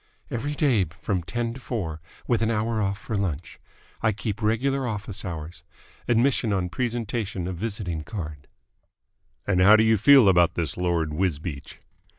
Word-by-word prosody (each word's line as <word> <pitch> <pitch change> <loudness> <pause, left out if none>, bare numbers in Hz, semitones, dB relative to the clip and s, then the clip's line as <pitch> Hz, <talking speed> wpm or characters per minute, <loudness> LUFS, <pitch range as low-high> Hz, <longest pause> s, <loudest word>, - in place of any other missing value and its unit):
"Every 145 +5 -3
day 130 - +3
from 90 +4 -3
ten 115 +7 -3
to 130 - -9
four, 90 -11 -4 0.2
with 120 -3 +1
an 110 - +2
hour 110 0 0
off 100 -1 -1
for 110 - -5
lunch. 90 -6 -3 0.4
I 110 - +3
keep 105 +1 -4
regular 130 +5 +1
office 100 -2 -4
hours. 85 -2 -6 0.5
Admission 120 -1 +2
on 95 -3 0
presentation 115 -4 -2
of 90 -2 -4
visiting 95 -6 -3
card." 75 -4 -7 1.0
"And 90 -3 +2
how 100 +3 +8
do 110 - +5
you 110 0 +4
feel 135 0 +7
about 90 -3 +4
this 80 -6 -2
Lord 85 -3 0
Wisbeach?" 75 -4 -3
100 Hz, 160 wpm, -25 LUFS, 85-115 Hz, 1.0 s, how